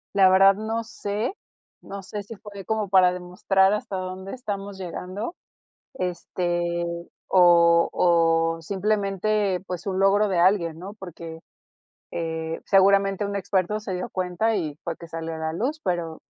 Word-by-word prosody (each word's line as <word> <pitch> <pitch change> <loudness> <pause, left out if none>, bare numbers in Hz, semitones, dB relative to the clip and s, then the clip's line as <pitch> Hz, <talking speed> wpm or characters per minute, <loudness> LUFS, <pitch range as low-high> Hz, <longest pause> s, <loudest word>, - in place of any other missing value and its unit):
La 190 -2 +6
verdad 195 +1 +6
no 220 +2 -3
sé, 210 - -3 0.5
no 200 0 -8
sé 205 +1 -6
si 210 +2 -10
fue 205 +1 -12
de - - -7
como 215 +1 -1
para 185 -1 +5
demostrar 180 +2 +1
hasta 205 -2 -3
dónde 185 +1 -6
estamos 200 -5 -5
llegando, 190 - -5 0.6
este, 175 -3 -2 0.5
o 170 -2 +6
o 165 -1 +3
simplemente, 200 +1 0
pues, 180 -2 -4
su 195 - -3
logro 195 +2 +3
de 185 -3 0
alguien, 170 -3 +3
¿no? 190 +4 -8
Porque, 170 -4 -9 0.7
eh, 160 -1 -3
seguramente 195 +1 +4
un 200 0 -4
experto 200 +1 0
se 205 -3 -5
dio 180 0 -4
cuenta 185 +5 0
y 155 -7 -2
fue 170 - -3
que 170 - -11
salió 165 0 -5
a - - -6
la 160 0 -3
luz, 260 - -2
pero, 170 -3 -3
190 Hz, 155 wpm, -24 LUFS, 175-200 Hz, 0.7 s, La